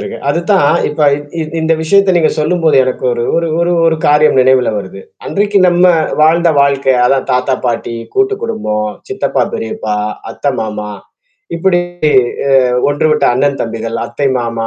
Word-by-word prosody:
இருக்கு. 105 - -6
அதுதான் 170 0 +2
இப்ப 150 +1 -6 0.2
இ - - -5 0.2
இ - - 0 0.2
இந்த 160 0 +1
விஷயத்த 195 +2 +3
நீங்க 160 -2 +2
சொல்லும்போது 160 -1 +1
எனக்கு 130 0 -4
ஒரு 120 0 -2
ஒரு 170 0 0
ஒரு 175 +1 +1
ஒரு 160 -1 +2
காரியம் 150 -1 +3
நினைவுல 130 -1 +3
வருது. 95 0 -8 0.3
அன்றைக்கு 205 0 0
நம்ம 175 +1 +2 0.4
வாழ்ந்த 170 +2 +3
வாழ்க்கை. 140 -2 +2
அதான் 135 +2 0
தாத்தா, 125 +1 0
பாட்டி, 115 0 -3 0.2
கூட்டு 400 +1 +1
குடும்பம், 105 - -3 0.2
சித்தப்பா - - -1
பெரியப்பா, 110 -1 -4 0.4
அத்த, 145 - -2
மாமா. 105 -1 -5 0.7
இப்பிடி 175 +1 +1 0.7
அ - - +1 0.4
ஒன்று 145 +2 0
விட்ட 150 -2 +1
அண்ணன் 140 +2 0
தம்பிகள், 115 0 -5
அத்தை 140 - -3
மாமா 115 -1 -3
145 Hz, 155 wpm, -13 LUFS, 120-170 Hz, 0.7 s, விஷயத்த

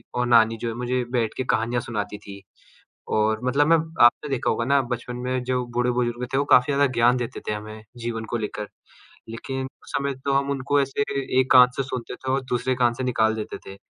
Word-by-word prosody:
और 125 - +1
नानी 115 -1 +4
जो 120 - -2
है - - -4
मुझे 125 +1 -1
बैठ 115 -4 0
के 130 - -1
कहानियाँ 120 0 0
सुनाती 105 -4 -4
थी। 100 -1 -11 0.7
और 110 0 +2
मतलब 140 +3 +2
मैं 165 +1 +6 0.3
आपने 135 +5 +3
देखा 135 -3 -1
होगा 115 +1 0
ना 140 +2 +3
बचपन 120 0 -6
में 130 0 -1
जो 125 0 -1
बूढ़े-बुज़ुर्ग 125 0 0
थे - - +2
वो 140 - +2
काफ़ी 125 +3 +5
ज़्यादा 140 +1 +3
ज्ञान 120 +1 +4
देते 120 -2 -4
थे - - 0
हमें 110 +1 -8
जीवन 115 -1 -4
को 120 - 0
लेकर। 105 -1 -5 0.6
लेकिन 130 +4 -5
उस 130 - -14
समय 140 0 -1
तो 140 - +1
हम 140 0 +1
उनको 140 +1 0
ऐसे 135 +1 -2 0.4
एक 130 - +1
कान 125 -1 +9
से 135 - 0
सुनते 125 -2 -5
थे 130 +1 -4
और 135 +1 +1
दूसरे 125 +1 0
कान 120 -2 +2
से 130 - -5
निकाल 110 -3 +1
देते 110 - -5
थे, 95 0 -9
125 Hz, 220 wpm, -24 LUFS, 115-130 Hz, 0.7 s, कान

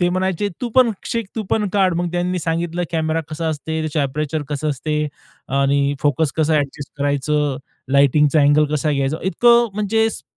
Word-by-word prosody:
ते 175 - +3
म्हणायचे 190 +2 -1
"तू 245 - -2
पण 255 -2 +6 0.2
शिक, 230 -2 -2
तू 220 - -1
पण 210 -2 +1
काढ." 190 -3 +2
मग 175 0 -1
त्यांनी 180 +1 -1
सांगितलं 170 +1 -2
कॅमेरा 160 0 0
कसा 160 +1 -3
असते, 160 +1 -3
त्याचं 155 -1 -1
एपरेचर 150 +2 -2
कसं 150 +1 -2
असते 150 +2 -3 0.7
आणि 140 +1 +2
फोकस 145 0 +1
कसं 160 0 +2
अँडजस्ट 140 -1 -2
करायचं, 145 0 0 0.4
लाइटिंगचा 145 +2 +4
अँगल 145 +2 +4
कसा 150 +1 0
घ्यायचा? 140 +1 0
इतकं 235 +6 +4
म्हणजे 220 +2 +1
स - - -8
155 Hz, 175 wpm, -20 LUFS, 145-180 Hz, 0.7 s, पण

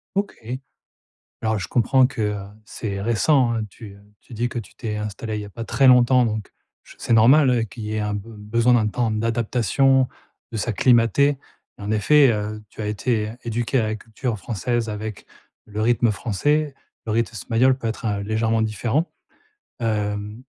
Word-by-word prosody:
OK. 200 0 -1 1.1
Alors 110 -2 +1
je 90 - -4
comprends 125 +2 +3
que, 125 -4 -5
heu, 105 0 0 0.3
c'est 100 -3 -5
récent, 120 +4 +2
hein, 115 - -1
tu 100 0 -12 0.3
tu 125 - -15
dis 120 +2 -1
que 120 - -6
tu 115 - -7
t'es 110 -2 -4
installée 105 +1 -4
il 105 - -3
y - - -6
a - - -10
pas 115 - -6
très 135 - +2
longtemps, 125 0 +6
donc 110 -2 -3 0.3
j - - -16
c'est 120 - -1
normal 125 0 +5
qu'il 110 0 -9
y 105 0 -4
ait 110 - -1
un 105 -1 -1
be 100 - -6
besoin 115 +4 +1
d'un 110 -3 +3
temps 115 +1 -1
d'adaptation, 120 +4 +2 0.4
de 115 - -4
s'acclimater. 120 +5 +3 0.4
En 100 +1 -4
effet, 135 +5 +5
heu, 105 0 -3
tu - - -9
as 105 - -3
été 105 0 -1
éduquée 120 +3 -1
à - - +1
la 110 0 -1
culture 110 +1 -4
française 115 +4 -2
avec 105 -1 -6 0.4
le 105 0 -7
rythme 120 0 +3
français, 135 +8 0 0.3
le 110 - -3
rythme 115 +1 0
espagnol 125 +5 +2
peut 115 - -8
être, 110 0 -4
heu, 100 -1 -1
légèrement 110 +1 +1
différent. 115 - -1 0.7
Hem, 105 0 -2
115 Hz, 180 wpm, -22 LUFS, 105-125 Hz, 1.1 s, longtemps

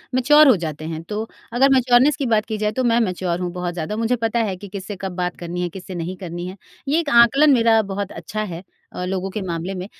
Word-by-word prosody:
Mature 295 +4 +6
हो 255 - +7
जाते 155 -1 -5
हैं 160 0 -5
तो 210 +1 -2 0.3
अगर 270 +3 +4
मैच्योरनेस 255 +2 +4
की 280 - -2
बात 220 -3 +2
की 220 -2 -4
जाए 210 0 0
तो 255 +3 -2
मैं 235 0 +3
मैच्योर 180 -4 -1
हूँ 180 -1 -3
बहुत 180 -1 -3
ज़्यादा 175 +5 -4
मुझे 230 +2 +1
पता 225 +1 0
है 185 - -3
कि 205 - -10
किससे 200 +1 -7
कब 190 -2 -4
बात 180 -1 -2
करनी 175 +1 -5
है 175 - -1
किससे 185 +1 -9
नहीं 175 +2 -4
करनी 175 -1 -6
है 190 +2 -8 0.3
ये 305 +4 +2
एक 310 -4 -2
आंकलन 275 +5 +6
मेरा 230 -2 +4
बहुत 200 -1 -4
अच्छा 215 0 -5
है 175 -3 -7 0.3
अ, 180 - -4
लोगों 190 +1 -2
के 210 +2 -5
मामले 170 +3 -3
में। 185 0 -5
200 Hz, 250 wpm, -21 LUFS, 180-235 Hz, 0.3 s, हो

